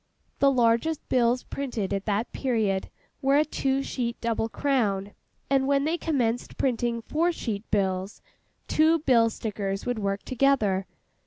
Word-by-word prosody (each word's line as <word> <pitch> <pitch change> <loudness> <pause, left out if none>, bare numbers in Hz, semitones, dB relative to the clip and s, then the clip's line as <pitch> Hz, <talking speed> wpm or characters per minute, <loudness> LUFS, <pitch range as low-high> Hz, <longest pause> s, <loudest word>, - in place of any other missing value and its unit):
The 280 - +5
largest 245 +5 +1
bills 245 0 +2
printed 240 -8 -3
at 195 0 -2
that 210 +2 -1
period 220 -7 0 0.3
were 275 0 +3
a 305 - +4
two 270 -2 -1
sheet 240 -3 -3
double 230 -1 -1
crown; 210 -8 0 0.4
and 270 -1 +2
when 280 0 +2
they 315 +3 +1
commenced 245 -7 -1
printing 240 -2 0
four 335 +7 +1
sheet 220 -9 -5
bills, 190 -1 -1 0.5
two 315 +2 +4
bill 245 -7 +3
stickers 200 -3 -4
would 245 -2 -1
work 200 -1 -2
together. 225 -8 +1
235 Hz, 145 wpm, -26 LUFS, 205-275 Hz, 0.5 s, The